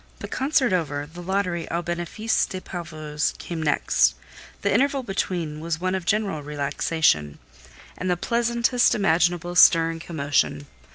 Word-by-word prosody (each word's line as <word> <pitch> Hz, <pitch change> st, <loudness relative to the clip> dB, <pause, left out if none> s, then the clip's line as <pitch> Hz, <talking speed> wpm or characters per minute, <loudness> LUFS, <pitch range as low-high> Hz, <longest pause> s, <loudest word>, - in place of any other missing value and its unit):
'" -, -, -29 dB
The -, -, -5 dB
concert 265 Hz, -5 st, +1 dB
over, 145 Hz, -5 st, -1 dB
the 165 Hz, +4 st, -11 dB
Lottery 180 Hz, -2 st, -2 dB
"au 170 Hz, +1 st, -2 dB
bénéfice 175 Hz, +6 st, -1 dB
des 185 Hz, -, -5 dB
pauvres" 155 Hz, -5 st, -4 dB
came 170 Hz, -2 st, -5 dB
next: 150 Hz, -2 st, +2 dB, 0.5 s
the -, -, +2 dB
interval 275 Hz, 0 st, +2 dB
between 175 Hz, -7 st, -3 dB
was 165 Hz, 0 st, -3 dB
one 185 Hz, +1 st, -1 dB
of 190 Hz, -2 st, -3 dB
general 200 Hz, -7 st, 0 dB
relaxation, 145 Hz, -, 0 dB, 0.6 s
and 185 Hz, -, -3 dB
the 180 Hz, -, +1 dB
pleasantest 235 Hz, +3 st, +2 dB
imaginable 175 Hz, -2 st, +1 dB
stir 165 Hz, -2 st, +6 dB
and 165 Hz, 0 st, -7 dB
commotion. 140 Hz, -, -1 dB
175 Hz, 150 wpm, -24 LUFS, 155-195 Hz, 0.6 s, stir